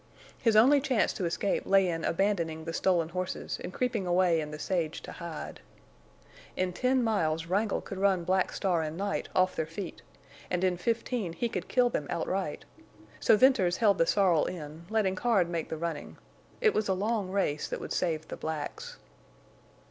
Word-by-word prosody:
His 225 -3 +2
only 270 +6 +6
chance 260 -5 +1
to 185 - -3
escape 170 +4 -1
lay 195 -1 +5
in 165 -2 -2
abandoning 165 -4 0
the 165 - -4
stolen 170 -2 +1
horses 185 +1 -4
and - - -5
creeping 230 -4 -1
away 175 -2 +3
in 150 - -5
the 150 - -6
sage 165 -2 -2
to - - -8
hide. 170 -2 -7 1.0
In 185 -1 0
ten 255 +4 +2
miles 165 -8 0
Wrangle 200 +4 0
could 195 - -7
run 195 -3 +2
Black 185 +2 +1
Star 180 -4 0
and 155 +1 -4
Night 200 +1 -2
off 185 0 +3
their 160 - -2
feet, 170 +2 -7 0.5
and 180 0 -1
in 185 -1 +2
fifteen 225 -1 -2
he 235 - -1
could 185 -6 -4
kill 245 -1 +3
them 145 - -2
outright. 175 -1 -2 0.5
So 220 - +5
Venters 210 -9 +4
held 205 -4 +3
the 165 - +4
sorrel 185 -6 +3
in, 160 -1 -7
letting 215 -4 +1
Card 195 -3 +2
make 170 -2 -3
the 160 - -3
running. 165 -2 -5 0.4
It 435 -3 +4
was 215 - 0
a 190 - +1
long 205 0 -1
race 185 -6 0
that - - -4
would - - -5
save 160 -3 -1
the - - -7
blacks. 155 -2 -5
185 Hz, 185 wpm, -29 LUFS, 165-210 Hz, 1.0 s, only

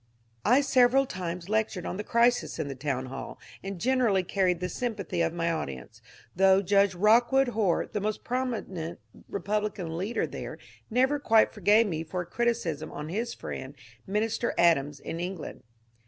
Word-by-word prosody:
I 250 +5 +5
several 265 -1 +4
times 180 -5 -5
lectured 215 -4 -1
on - - -4
the 210 - -3
crisis 240 +2 +2
in 160 -3 -2
the - - -3
town 130 -1 -3
hall, 135 +1 -7 0.3
and 195 -2 -5
generaUy 230 -6 +2
carried 185 -3 +1
the 180 - -2
sympathy 205 -3 -3
of 165 0 +1
my 170 0 -1
audience, 65 - -5 0.3
though 190 +1 +5
Judge 200 0 +3
Rock 220 +6 +4
wood 270 -1 +4
Hoar, 210 -7 +1
the 210 - -4
most 215 +1 -2
prominent 220 -10 -3 0.3
Republican 200 -4 -2
leader 200 +7 -1
there, - - -7 0.3
never 260 +5 +2
quite 225 -5 +4
forgave 210 +2 +4
me 165 -6 -2
for 180 +3 -4
a - - -6
criticism 175 -8 -1
on 150 +1 -6
his 230 +7 -3
friend 130 +2 -7 0.3
Minister 215 +4 -1
Adams 150 -4 +3
in 165 - -6
England. 180 -1 -5
195 Hz, 165 wpm, -28 LUFS, 170-230 Hz, 0.3 s, I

